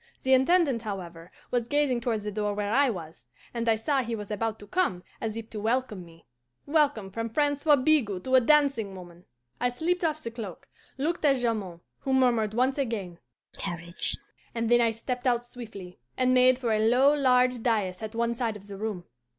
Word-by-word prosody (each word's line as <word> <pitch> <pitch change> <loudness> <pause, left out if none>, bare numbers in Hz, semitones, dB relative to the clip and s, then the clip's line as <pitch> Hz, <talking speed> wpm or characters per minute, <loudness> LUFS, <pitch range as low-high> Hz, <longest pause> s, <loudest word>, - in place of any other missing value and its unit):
The 265 - +3
Intendant, 270 -2 +3
however, 175 -5 -7 0.2
was 240 -2 0
gazing 285 -3 +1
towards 225 -3 -1
the 210 - -3
door 205 0 -2
where 205 +1 -2
I 275 +2 +4
was, 160 - -8 0.2
and 235 -1 -1
I 225 - +5
saw 270 +5 0
he 235 -2 -3
was 210 -1 -7
about 220 +1 -2
to 205 - -12
come, 205 - 0 0.2
as 220 -1 -3
if 225 -1 -6
to 215 - -5
welcome 225 -3 -1
me. 165 -1 -17 0.4
Welcome 285 -10 +1
from 230 +3 -3
Francois 290 +3 +3
Bigot 255 -9 +1
to 260 - -3
a 260 - +7
dancing 275 -7 +2
woman! 175 -1 -12 0.3
I 245 - +1
slipped 340 +9 -1
off 310 -1 -1
the 230 - -4
cloak, 220 -6 -8 0.3
looked 315 +6 -2
at 280 -2 +5
Jamond, 215 -9 -2 0.2
who 265 - -2
murmured 235 -5 +2
once 260 +3 +1
again, 205 -10 -3 0.4
'Courage,' 170 0 -2 0.4
and 230 -1 -1
then 240 0 +6
I 230 - +4
stepped 245 +3 -4
out 240 -1 +1
swiftly, 210 -7 -10 0.2
and 255 0 +3
made 255 0 +5
for 245 -3 -2
a 215 - +1
low, 265 +4 +5
large 250 -3 +3
dais 205 -6 0
at 220 +1 -6
one 235 0 0
side 230 -2 -2
of 200 - -15
the 200 -1 -9
room. 205 -4 -4
230 Hz, 200 wpm, -27 LUFS, 205-260 Hz, 0.4 s, a